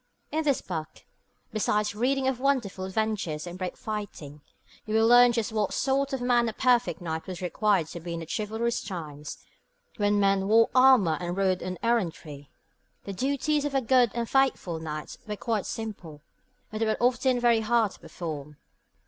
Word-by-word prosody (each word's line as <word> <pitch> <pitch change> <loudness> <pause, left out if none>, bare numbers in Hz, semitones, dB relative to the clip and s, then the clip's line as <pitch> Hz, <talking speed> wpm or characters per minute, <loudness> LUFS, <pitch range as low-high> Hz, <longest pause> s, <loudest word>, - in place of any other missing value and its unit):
In 315 +1 0
this 285 -4 +1
book, 160 -4 -6 0.5
besides 210 -1 0
reading 260 +5 0
of 260 -2 0
wonderful 250 -9 0
adventures 190 -6 -2
and 175 0 -7
brave 185 -1 -4
fighting, 195 -9 -6 0.5
you 215 - -1
will 220 0 +4
learn 245 +1 +7
just 230 -2 -1
what 215 -3 -1
sort 275 +1 0
of 265 -2 -3
man 240 -1 +2
a - - -6
perfect 240 -9 +2
knight 160 -2 -4
was 185 -2 -6
required 190 0 +1
to 170 - -7
be 170 0 -5
in - - -4
the 165 - -6
chivalrous 220 +5 -2
times 155 -7 -7 0.6
when 205 -1 +2
men 195 -1 +2
wore 225 +2 +4
armour 255 - +5
and 175 +1 -3
rode 190 -2 +1
on 185 0 -4
errantry. 165 -11 -2 0.5
The 200 - -6
duties 280 +6 0
of 290 -1 -3
a 270 - +3
'good 250 -1 +4
and 235 -1 -1
faithful 260 -11 +1
knight' 155 -1 -6
were 210 - -3
quite 220 -3 -2
simple, 180 -10 -7 0.5
but 215 - -5
they 225 - +1
were 215 - +1
often 250 +1 +2
very 240 -2 +4
hard 225 -2 +2
to - - -15
perform. 150 -4 -7
215 Hz, 180 wpm, -27 LUFS, 175-245 Hz, 0.6 s, learn